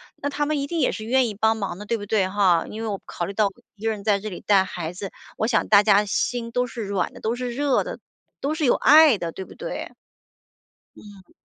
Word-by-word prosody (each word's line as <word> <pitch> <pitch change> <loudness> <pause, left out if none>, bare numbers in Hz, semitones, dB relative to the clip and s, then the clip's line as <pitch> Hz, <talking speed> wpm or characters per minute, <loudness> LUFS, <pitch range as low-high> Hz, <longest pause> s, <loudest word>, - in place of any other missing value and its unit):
那 285 - -3
他 290 +1 -1
们 305 - 0
一 280 - -1
定 335 +3 -3
也 - - +2
是 215 - -6
愿 255 +2 +3
意 210 - -5
帮 220 +2 +2
忙 195 -4 -4
的， 210 - -9
对 230 +2 -1
不 205 - -6
对， 200 -3 +2
哈？ 190 -4 +2
因 220 - -7
为 225 - -3
我 200 -2 -3
考 175 - -4
虑 200 - -6
到 210 0 +2 0.3
一 210 - -16
个 225 - +1
人 210 -2 -6
在 205 -2 +2
这 215 +2 -5
里 180 - -8
带 200 -2 +4
孩 175 -3 -5
子， 190 +1 -6 0.3
我 - - 0
想 230 0 +1
大 205 -1 +6
家 205 -1 +5
心 235 +3 -2
都 250 +1 +1
是 235 -3 -6
软 200 -2 -1
的、 - - -12
都 225 +2 -1
是 250 0 -4
热 280 +1 +1
的、 - - -7 0.4
都 295 +3 -1
是 315 -2 0
有 245 - +5
爱 300 -3 +6
的， 170 -1 -3
对 190 - -7
不 - - -13
对？ - - -6 1.1
嗯。 200 -3 -15
215 Hz, 280 characters per minute, -23 LUFS, 200-250 Hz, 1.1 s, 大